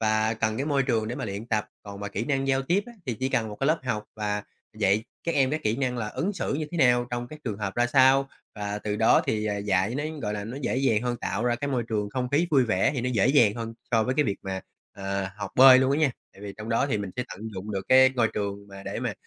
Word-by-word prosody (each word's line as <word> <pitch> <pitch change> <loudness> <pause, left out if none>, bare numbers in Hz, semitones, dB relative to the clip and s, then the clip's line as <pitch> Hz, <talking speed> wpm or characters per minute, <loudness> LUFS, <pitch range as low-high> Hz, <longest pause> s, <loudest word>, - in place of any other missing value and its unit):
và 110 0 +1
cần 110 0 -1
cái 140 - -2
môi 140 -2 +2
trường 115 -4 0
để 120 - -3
mà - - -4
luyện 100 +2 -5
tập. 105 -2 0 0.2
Còn 100 -1 -9
mà 100 - -4
kỹ 100 +3 -3
năng 135 -2 0
giao 135 0 +2
tiếp 175 +9 +1
á, 240 - -10
thì 120 - -1
chỉ 130 - +1
cần 115 -4 0
một 105 - -8
cái 135 - +1
lớp 160 +2 +3
học 105 -4 -2
và 105 -1 -2 0.4
dạy 100 +3 +2 0.2
các 170 - -1
em 135 -2 +3
các 155 +1 -2
kỹ 110 +1 0
năng 125 -2 -1
là 105 -2 -2
ứng 180 - -2
xử 185 - -2
như 155 +2 -2
thế 170 - -3
nào 120 -3 +4
trong 120 0 -3
các 155 - -10
trường 105 -4 -3
hợp 100 -2 -3
ra 120 0 +2
sao. 135 +1 +4 0.3
Và 105 0 -4
từ 105 0 -3
đó 110 - +4
thì, 105 -1 0
ờ, 105 -1 -1
dạy 100 +2 0
nó, 145 +2 -2 0.2
gọi 105 -1 -2
là, 100 - -4
nó 115 +5 -6
dễ - - -1
dàng 125 -5 +2
hơn, 120 -1 -1
tạo 105 +4 -2
ra 120 -1 +2
cái 140 +3 -3
môi 125 -3 0
trường 105 -2 -1
không 125 +2 -2
khí 145 +6 +2
vui 135 -4 +4
vẻ 105 -5 +2
thì 130 - -1
nó 125 - -1
dễ 105 -3 +3
dàng 120 -7 +5
hơn 115 -1 -5 0.2
so 115 -2 +3
với 130 - -1
cái 150 +1 +3
việc 100 - -1
mà, 95 -1 -4 0.3
à, 95 -1 -3
học 100 -2 -5
bơi 130 0 +9
luôn 130 +1 +2
á 140 - +1
nha. 155 -3 +3 0.2
Tại 100 - -15
vì 100 -1 -6
trong 110 +1 -7
đó 115 +4 +2
thì 115 -7 -1
mình 100 -2 -4
sẽ 125 - -1
tận 95 - -9
dụng 95 +3 -6
được 95 -1 -2
cái 130 0 +7
ngôi 120 -3 +2
trường 100 -1 -4
mà 100 0 -10
để - - -5
mà, - - -2
115 Hz, 300 wpm, -26 LUFS, 105-130 Hz, 0.4 s, bơi